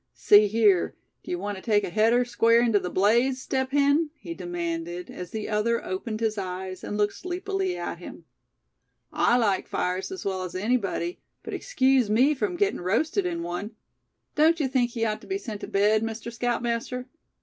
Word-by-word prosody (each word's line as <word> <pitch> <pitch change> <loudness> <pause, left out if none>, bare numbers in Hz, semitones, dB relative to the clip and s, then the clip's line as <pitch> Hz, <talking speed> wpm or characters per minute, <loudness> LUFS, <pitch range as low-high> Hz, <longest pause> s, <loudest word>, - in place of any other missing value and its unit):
"See 210 0 +6
here, 205 -4 +3 0.3
d'ye - - -3
want 200 +2 -4
to - - -9
take 210 -2 +2
a - - -4
header 230 +5 +3
square 230 -1 +3
into 225 -4 +3
the 180 - -4
blaze, 235 +8 +2
Step 265 0 -2
Hen?" 285 +3 +3
he 180 - -7
demanded, 175 0 -4
as 180 -1 -7
the 220 -1 -4
other 225 +2 0
opened 215 +4 -4
his 220 -2 0
eyes, 185 0 -5
and 205 - -4
looked 205 -1 +1
sleepily 370 +1 -3
at - - -5
him. - - -10 0.9
"I 240 - +3
like 205 -6 +1
fires 180 - -2
as 380 - -7
well 190 -1 -1
as 180 -1 -6
anybody, 240 - -1 0.2
but - - -7
excuse 265 - +2
me 255 +8 +4
from 355 +6 -2
getting 400 - 0
roasted 200 - +1
in 170 -1 -3
one. 180 +6 -5 0.6
Don't 320 +2 +4
you 290 - +1
think 255 -2 +1
he 230 -1 -2
ought 215 -1 -2
to - - -14
be 385 - -1
sent 220 - -7
to - - -5
bed, 210 +2 +3
Mr. 225 +1 -5
Scoutmaster? 240 +1 -2
225 Hz, 185 wpm, -26 LUFS, 190-255 Hz, 0.9 s, See